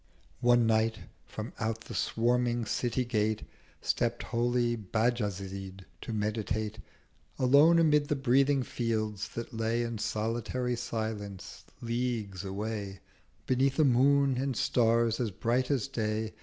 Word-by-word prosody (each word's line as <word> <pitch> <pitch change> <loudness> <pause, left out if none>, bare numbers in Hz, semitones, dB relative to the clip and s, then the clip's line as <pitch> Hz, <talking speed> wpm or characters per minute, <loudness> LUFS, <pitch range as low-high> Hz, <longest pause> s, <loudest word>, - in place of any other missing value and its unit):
One 120 -1 +4
Night 110 0 +2 0.3
from 110 +1 -6
out 110 0 -2
the - - -9
swarming 120 0 +1
City 125 +3 -1
Gate 110 -2 0 0.4
Stept 120 0 0
holy 120 0 +1
Bajazyd, 100 -4 -2 0.2
to - - -6
meditate 110 0 -2 0.6
Alone 140 +6 +6
amid 150 -3 +4
the 150 - +1
breathing 135 +1 +3
Fields 110 -4 -2
that 115 0 -5
lay 115 +1 0
In 115 -2 -4
solitary 120 +3 -1
Silence 110 -4 -5 0.2
leagues 115 -5 -2
away, 100 0 -4 0.5
Beneath 130 +1 +1
a 155 - +5
Moon 135 +1 +4
and 135 -3 -1
Stars 115 -1 +2
as 120 -3 0
bright 120 +6 0
as 135 -3 +1
Day. 110 -4 -2
115 Hz, 125 wpm, -30 LUFS, 110-125 Hz, 0.6 s, Alone